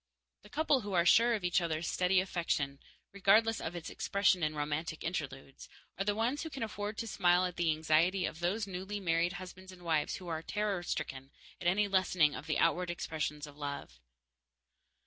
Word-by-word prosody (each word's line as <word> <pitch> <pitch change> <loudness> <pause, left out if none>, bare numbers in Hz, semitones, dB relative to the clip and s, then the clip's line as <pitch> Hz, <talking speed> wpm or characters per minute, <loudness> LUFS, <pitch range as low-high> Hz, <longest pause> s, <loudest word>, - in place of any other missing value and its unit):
The - - -16
couple 295 -3 +2
who 205 -2 -5
are 170 -1 +3
sure 230 +6 +6
of 205 - -5
each 180 +1 +2
other's 160 -1 -2
steady 185 +1 +3
affection, 165 -7 -1 0.3
regardless 215 +3 +3
of 165 - -4
its 170 -2 -6
expression 200 -2 +2
in 155 -1 0
romantic 150 +2 -3
interludes, 135 -5 -5 0.3
are 195 - -1
the 205 +1 0
ones 240 +6 0
who 320 - -4
can 275 -5 -5
afford 210 0 -4
to 230 - -3
smile 180 -3 +3
at 180 -1 -4
the 170 -1 +1
anxiety 160 +4 +2
of 160 - -5
those 195 +5 0
newly 195 +2 -5
married 170 -1 +1
husbands 185 0 -9
and 180 -1 -14
wives 160 -3 0
who 180 - -9
are 160 -2 -2
terror 205 +1 -1
stricken 135 -5 -4 0.3
at 175 - -1
any 205 +4 +3
lessening 185 -6 +3
of 150 - -7
the 155 - 0
outward 175 +2 +2
expressions 155 -3 -3
of 145 -1 -13
love. 140 - -6
180 Hz, 190 wpm, -33 LUFS, 160-200 Hz, 0.3 s, sure